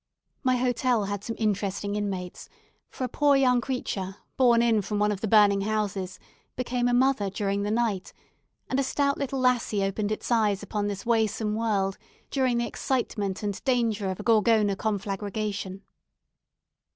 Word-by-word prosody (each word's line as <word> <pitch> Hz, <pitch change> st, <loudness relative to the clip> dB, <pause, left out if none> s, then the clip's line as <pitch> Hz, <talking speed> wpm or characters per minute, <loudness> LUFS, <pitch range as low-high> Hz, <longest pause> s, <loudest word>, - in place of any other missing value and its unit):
My 255 Hz, -2 st, +2 dB
hotel 245 Hz, -2 st, +1 dB
had 205 Hz, 0 st, -4 dB
some 230 Hz, -, -4 dB
interesting 205 Hz, -1 st, -1 dB
inmates, 190 Hz, -4 st, -4 dB, 0.4 s
for -, -, -6 dB
a -, -, +1 dB
poor 285 Hz, +3 st, +3 dB
young 250 Hz, -2 st, +4 dB
creature, 195 Hz, -7 st, -3 dB, 0.2 s
borne 240 Hz, -3 st, +4 dB
in 225 Hz, -3 st, +3 dB
from 205 Hz, +2 st, -3 dB
one 210 Hz, 0 st, +2 dB
of 200 Hz, -2 st, -4 dB
the 220 Hz, -, -1 dB
burning 205 Hz, -2 st, +5 dB
houses, 200 Hz, -3 st, -2 dB, 0.4 s
became 245 Hz, -1 st, -1 dB
a -, -, +2 dB
mother 255 Hz, -5 st, +2 dB
during 200 Hz, 0 st, -1 dB
the 205 Hz, -, -1 dB
night; 220 Hz, -4 st, -1 dB, 0.6 s
and 265 Hz, -, 0 dB
a -, -, +2 dB
stout 280 Hz, +1 st, 0 dB
little 275 Hz, -1 st, -2 dB
lassie 245 Hz, -5 st, +2 dB
opened 205 Hz, +2 st, -1 dB
its 215 Hz, -, -4 dB
eyes 210 Hz, -4 st, +2 dB
upon 205 Hz, 0 st, -2 dB
this 200 Hz, -1 st, -4 dB
waesome 220 Hz, -2 st, +1 dB
world 205 Hz, -3 st, 0 dB, 0.3 s
during 260 Hz, -3 st, +1 dB
the 235 Hz, -, +1 dB
excitement 210 Hz, -7 st, -2 dB
and 205 Hz, -2 st, -3 dB
danger 230 Hz, -6 st, +1 dB
of 185 Hz, -, -4 dB
a -, -, -5 dB
Gorgona 220 Hz, -3 st, +3 dB
conflagration. 200 Hz, -1 st, -3 dB
215 Hz, 165 wpm, -27 LUFS, 200-245 Hz, 0.6 s, burning